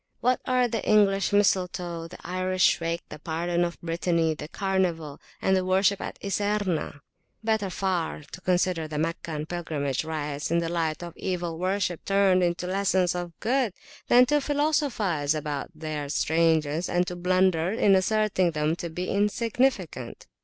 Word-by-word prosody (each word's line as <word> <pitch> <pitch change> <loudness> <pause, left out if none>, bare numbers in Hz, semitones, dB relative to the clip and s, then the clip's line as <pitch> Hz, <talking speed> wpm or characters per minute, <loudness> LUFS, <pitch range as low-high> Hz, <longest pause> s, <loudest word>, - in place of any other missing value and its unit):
What 250 +2 +1
are 255 -1 +3
the 230 -2 -3
English 200 -2 +3
mistletoe, 180 -4 +1
the 180 - -11
Irish 185 +1 +2
wake, 165 0 -2
the 150 - -9
Pardon 170 +3 -1
of 170 0 -3
Brittany, 165 -1 0
the 150 -1 -7
Carnival, 175 -6 -1 0.2
and 190 - +2
the 185 - +1
Worship 190 +2 +2
at - - -6
Iserna? 200 -7 -1 0.4
Better 220 -3 0
far 180 -5 -2
to 185 - -9
consider 180 -3 +1
the 155 -1 -5
Meccan 160 -1 -3
pilgrimage 155 -6 -2
rites 150 -2 -3
in 170 - +2
the 170 -1 0
light 165 -1 -1
of 170 -1 -8
Evil 175 -3 -3
worship 185 -2 -1
turned 195 -2 +3
into 175 0 0
lessons 185 -1 +1
of 175 -2 -6
Good 245 -3 +1 0.3
than 245 +1 +7
to 295 +3 +2
philosophize 275 - 0
about 150 -2 -3
their 155 -2 -4
strangeness, 160 +1 +1
and 175 0 +2
to 180 - -5
blunder 180 -1 +2
in 205 -1 +3
asserting 190 -1 +2
them 150 +1 0
to 170 - -5
be 180 +3 -4
insignificant. 205 - -1
180 Hz, 155 wpm, -26 LUFS, 165-195 Hz, 0.4 s, than